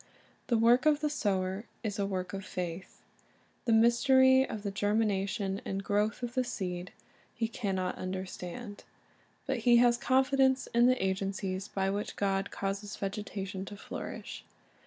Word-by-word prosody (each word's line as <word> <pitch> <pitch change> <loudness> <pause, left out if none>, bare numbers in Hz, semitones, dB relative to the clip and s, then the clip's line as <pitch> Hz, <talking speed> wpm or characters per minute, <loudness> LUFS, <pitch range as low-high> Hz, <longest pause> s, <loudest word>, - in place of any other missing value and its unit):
The 235 - +2
work 240 +5 +5
of 300 -1 +4
the 300 -1 0
sower 195 -4 -1 0.2
is 205 -2 -3
a 200 - +1
work 185 -1 -3
of 195 0 -4
faith, 180 0 -6 0.6
of 230 - +5
the 260 -3 +4
germination 200 -1 0
and 195 0 -3
growth 210 +4 0
of 240 0 -3
the 255 - +1
seed 180 -6 -4 0.4
he 225 - 0
can 205 -4 -3
not 185 -1 -2
understand. 185 +3 -6 0.6
But - - -1
he 240 -1 +5
has 240 0 +5
confidence 265 0 +3
in 240 +1 +5
the 255 0 +3
agencies 190 0 -2
by 195 0 -1
which 205 +1 -3
God 195 0 0
causes 200 +1 -4
vegetation 195 -1 -4
to 205 +1 -9
flourish. - - -7
205 Hz, 145 wpm, -31 LUFS, 190-240 Hz, 0.6 s, work